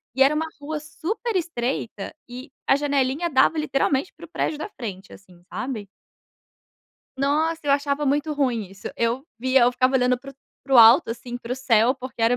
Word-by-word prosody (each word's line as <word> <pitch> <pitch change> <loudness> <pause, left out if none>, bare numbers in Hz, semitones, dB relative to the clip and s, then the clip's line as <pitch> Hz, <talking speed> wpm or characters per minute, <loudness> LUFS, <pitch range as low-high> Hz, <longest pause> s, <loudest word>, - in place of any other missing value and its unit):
E 265 - -1
era 275 +3 +5
uma 320 +1 0 0.2
rua 300 +1 -4
super 365 +9 -4
estreita 245 - -3 0.2
e 255 +3 -9 0.2
a - - +5
janelinha 285 +3 0
dava 275 +4 +4
literalmente 280 0 0
para 340 - -11
o - - -20
prédio 305 -2 -2
da 365 - -5
frente, 200 - -8
assim, 185 -2 -16
sabe. 245 -6 -5 1.3
Nossa, 310 +4 +1
eu 290 - +1
achava 285 +1 0
muito 295 +2 0
ruim 250 -7 0
isso. 195 - -8
Eu 235 +3 0
via 260 +2 +3
eu 240 +1 +5
ficava 255 +1 +1
olhando 250 -1 +3
para 275 +2 -10
o - - -24 0.3
para 270 - +2
o - - +8
alto, 230 +4 +8
assim, 240 +1 -7
para 240 0 -8
o - - 0
céu, 245 -2 +3
porque 255 -3 -8
era 230 +2 +4
265 Hz, 195 wpm, -23 LUFS, 245-295 Hz, 1.3 s, o